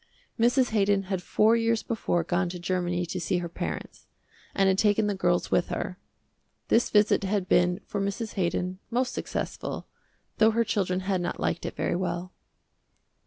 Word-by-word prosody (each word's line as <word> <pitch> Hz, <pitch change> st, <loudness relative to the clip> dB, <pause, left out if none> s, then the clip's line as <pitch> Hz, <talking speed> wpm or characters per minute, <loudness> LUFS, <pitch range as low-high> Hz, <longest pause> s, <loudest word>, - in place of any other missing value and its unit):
Mrs. 245 Hz, +2 st, +3 dB
Haydon 200 Hz, -2 st, +2 dB
had 185 Hz, -, -1 dB
four 215 Hz, +5 st, +3 dB
years 230 Hz, -1 st, +1 dB
before 175 Hz, -6 st, -1 dB
gone 175 Hz, +1 st, 0 dB
to 180 Hz, -, -6 dB
Germany 175 Hz, 0 st, -1 dB
to 175 Hz, -, -4 dB
see 180 Hz, +1 st, 0 dB
her 175 Hz, -1 st, -3 dB
parents, 170 Hz, -, -6 dB, 0.5 s
and 195 Hz, -, +3 dB
had 190 Hz, 0 st, +3 dB
taken 210 Hz, 0 st, +3 dB
the 205 Hz, -, 0 dB
girls 175 Hz, -2 st, 0 dB
with 175 Hz, -, +2 dB
her. 180 Hz, -, -4 dB, 0.7 s
This 235 Hz, -, +3 dB
visit 210 Hz, -1 st, +4 dB
had 195 Hz, -1 st, -1 dB
been 180 Hz, 0 st, +3 dB
for 200 Hz, -, -3 dB
Mrs. 200 Hz, +3 st, -3 dB
Haydon 180 Hz, 0 st, -1 dB
most 250 Hz, +2 st, 0 dB
successful, -, -, -4 dB, 0.5 s
though 220 Hz, -, +7 dB
her 230 Hz, +1 st, +2 dB
children 190 Hz, -4 st, 0 dB
had 190 Hz, -1 st, 0 dB
not 175 Hz, -, -3 dB
liked 170 Hz, -, -1 dB
it -, -, -6 dB
very -, -, -1 dB
well. 180 Hz, 0 st, -3 dB
190 Hz, 170 wpm, -27 LUFS, 180-215 Hz, 0.7 s, though